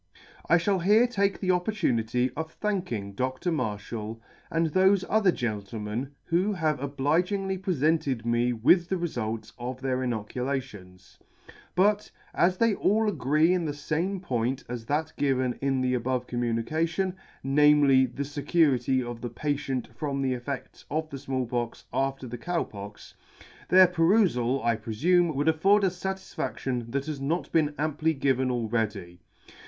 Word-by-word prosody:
I 165 - +6
{hall 190 +3 +1
here 210 +7 +5
take 200 -5 0
the 185 -2 +1
opportunity 130 - 0
of 160 +1 -5
thanking 175 - -3
Dr. 130 - -2
Marflial 110 -4 -3 0.3
and 165 -1 0
thofe 190 +2 +4
other 210 -4 +3
gentlemen 110 - -4
who 185 +5 +1
have 155 -6 0
obligingly 175 +8 0
prefented 155 -8 0
me 120 +1 +2
with 150 +10 +3
the 190 - +1
refult 115 -10 -3
of 125 +1 -5
their 130 -1 -1
inoculations; 120 -5 -5 0.6
but, 205 +3 +2 0.2
as 180 +1 +2
they 230 0 +3
all 215 +2 +2
agree 155 - +2
in 180 -2 0
the 150 - -2
fame 165 +7 -2
point 130 -6 -2
as 120 -2 -6
that 155 +2 -1
given 130 -3 +1
in 135 -1 +1
the 130 0 +1
above 125 +1 -1
communication, 155 +11 -1 0.3
namely, 140 -1 +5
the 130 +4 -4
fecurity 140 -3 +1
of 120 -1 -6
the 120 - -4
patient 135 0 -2
from 140 0 -2
the 130 -1 +1
effedts 125 +2 -6
of 155 +1 -2
the 135 - -6
Small 130 -1 -2
Pox 120 0 -4
after 135 0 -1
the 120 -1 -7
Cow 175 +5 -1
Pox, 100 0 -10 0.6
their 185 +1 +8
perufal, 165 - +2
I 115 -1 +2
prefume, 160 +10 +1
would 145 +3 0
afford 195 +6 +4
us 180 -2 -1
fatisfadlion 135 -10 -3
that 140 +1 -1
has 150 -3 -5
not 160 +6 -2
been 150 -2 +2
amply 155 +1 0
given 130 -2 +1
already. 110 -7 -2
140 Hz, 150 wpm, -27 LUFS, 120-175 Hz, 0.6 s, their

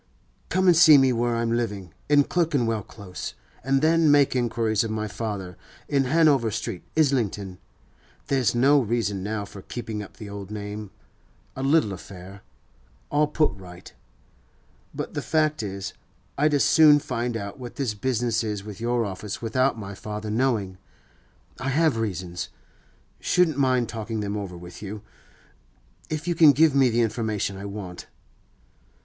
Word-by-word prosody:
'Come 185 0 +1
and 180 -2 +6
see 160 -3 +8
me 135 -2 +4
where 120 0 0
I'm 115 0 0
living, 105 -8 -2 0.2
in 145 -1 +6
Clerkenwell 140 -11 0
Close, 100 -2 -8 0.3
and 135 +2 +1
then 165 0 +4
make 145 -2 +4
inquiries 115 -3 +1
of 115 - -3
my 110 0 -2
father, 100 -5 -5 0.3
in 140 -2 +1
Hanover 140 -4 +3
Street, 105 -4 -4 0.2
Islington. 105 -11 0 0.7
There's 130 -5 +1
no 140 +4 +5
reason 115 -5 -1
now 105 +1 -3
for 100 0 -11
keeping 110 0 -5
up 100 - -11
the 110 - -8
old 100 -1 -8
name—a 105 +4 -10
little 135 -6 +2
affair—all 95 - -6
put 150 0 +1
right. 90 -3 -12 1.0
But - - -6
the - - -2
fact 155 -1 +1
is, 100 -2 -5 0.4
I'd 150 +1 +2
as 140 - +3
soon 155 -2 +7
find 125 -5 -2
out 100 +4 -7
what 120 -2 -8
this 130 -6 -1
business 115 +1 0
is 105 -2 -3
with 105 0 -9
your 120 0 +1
office 100 +3 -5
without 130 +2 +1
my 100 -2 -7
father 105 +2 -6
knowing. 110 -6 0 0.8
I 130 +1 -2
have 155 -1 +2
reasons; 90 -5 -3 0.7
shouldn't 175 -5 +2
mind 130 -3 +2
talking 110 -1 -4
them 100 0 -3
over 100 -4 -5
with 90 0 -11
you, 105 0 -7 1.1
if 155 +2 -4
you 175 - +2
can 155 -3 +7
give 155 +1 +4
me 135 -2 +4
the 120 +1 +1
information 110 -3 -1
I 95 +1 -7
want. 100 -3 -7
115 Hz, 155 wpm, -25 LUFS, 100-135 Hz, 1.1 s, see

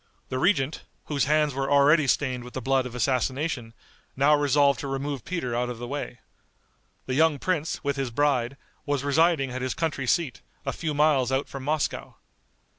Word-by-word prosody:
The 130 - -2
regent, 150 -4 +1 0.2
whose 145 -2 0
hands 150 0 +2
were 135 +1 -2
already 145 +1 +5
stained 130 -2 0
with 125 - -11
the - - -1
blood 135 -1 +1
of 125 - -10
assassination, 130 -1 -1 0.4
now 140 +3 +4
resolved 145 -2 +3
to 140 - -4
remove 135 0 -3
Peter 160 -10 -3
out 125 +1 -1
of 120 - -5
the 120 - -6
way. 140 -2 -5 0.9
The 130 - -3
young 155 +1 +3
prince, 160 0 -2
with 140 -1 -1
his 135 -2 -1
bride, 135 0 0 0.3
was 145 -2 0
residing 145 -1 +2
at 130 +1 -4
his 130 -3 -2
country 155 -5 -2
seat, 170 -5 0 0.2
a - - -1
few 155 -3 -3
miles 145 -4 +3
out 135 +2 0
from 135 - -7
Moscow. 150 +1 -2
140 Hz, 185 wpm, -26 LUFS, 130-150 Hz, 0.9 s, already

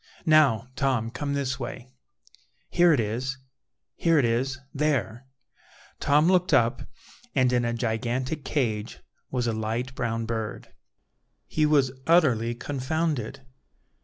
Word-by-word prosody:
Now, 140 - +4
Tom, 130 -6 0
come 140 +2 -3
this 135 -2 -2
way; 125 0 -7 0.8
here 175 0 +5
it 145 - +3
is, 120 +5 -2 0.6
here 165 -1 +2
it 140 - +4
is, 130 +3 0 0.2
there." 135 -5 -1 0.7
Tom 150 +2 +3
looked 180 0 +3
up, 120 0 +2 0.5
and 130 -2 +3
in 120 -1 +2
a 120 - 0
gigantic 120 +5 -2
cage 110 -7 -2 0.3
was 125 -2 -1
a 115 - 0
light 115 +4 -3
brown 115 -2 -2
bird. 110 -2 -5 0.7
He 155 - +1
was 140 -4 +3 0.2
utterly 125 -9 +3
confounded. 140 -1 -2
130 Hz, 125 wpm, -26 LUFS, 115-145 Hz, 0.8 s, here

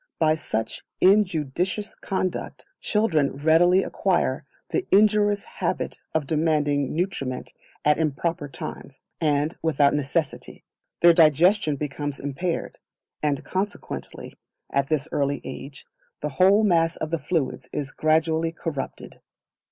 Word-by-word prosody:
By 155 -1 +3
such 115 -8 -4 0.2
injudicious 185 0 +2
conduct, 190 -2 -4
children 165 - +1
readily 170 +5 +4
acquire - - 0 0.2
the 385 - -1
injurious 205 0 +4
habit - - -3
of 155 -2 +1
demanding 150 -2 +1
nutriment 160 -8 -3 0.3
at 150 +1 +4
improper 160 0 -1
times, 135 0 -8 0.2
and 150 0 +1
without 145 -3 +3
necessity; 150 +2 -2 0.4
their 170 0 +8
digestion 165 +1 +4
becomes 145 0 -4
impaired; 155 +5 -3 0.4
and 145 -2 0
consequently, 195 +2 -5 0.4
at 140 0 0
this 155 -1 0
early 140 0 0
age, 135 +2 -8 0.4
the 150 - -2
whole 190 +9 +4
mass 165 -4 +3
of 155 - -5
the 165 - 0
fluids 140 -4 -2
is 140 -1 -4
gradually 160 +1 +1
corrupted. 165 -4 -6
160 Hz, 115 wpm, -24 LUFS, 145-180 Hz, 0.4 s, their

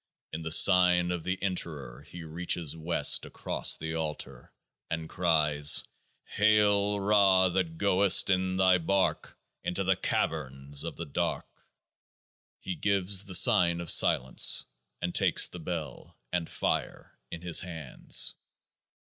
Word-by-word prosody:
In 80 - -6
the 80 0 -6
Sign 90 +1 +4
of 90 -2 -5
the 90 0 -3
Enterer 75 -10 -6
he 85 -1 -12
reaches 80 -1 -4
West 80 -2 +2
across - - -1
the 80 +1 -6
Altar, 75 -5 -7 0.4
and 80 -1 -5
cries: 75 -4 +1 0.4
Hail 105 -1 +1
Ra, 100 -2 +3
that 90 -3 -3
goest 100 0 +3
in 95 0 -1
Thy 95 -1 +3
bark 95 +3 -2 0.3
Into 95 +2 -3
the 95 0 +1
Caverns 70 -5 -3
of 85 - -7
the 85 - -7
Dark! 70 - -3 1.1
He 95 - -6
gives 100 0 -1
the 95 - -3
sign 85 0 +4
of 85 - -3
Silence, 65 +1 +4 0.4
and 90 0 -3
takes - - +3
the 90 - -11
Bell, 80 -5 -8 0.2
and 85 -2 -3
Fire, - - -4
in 85 - -9
his 85 -2 +2
hands. 80 -7 -1
90 Hz, 130 wpm, -27 LUFS, 80-95 Hz, 1.1 s, Sign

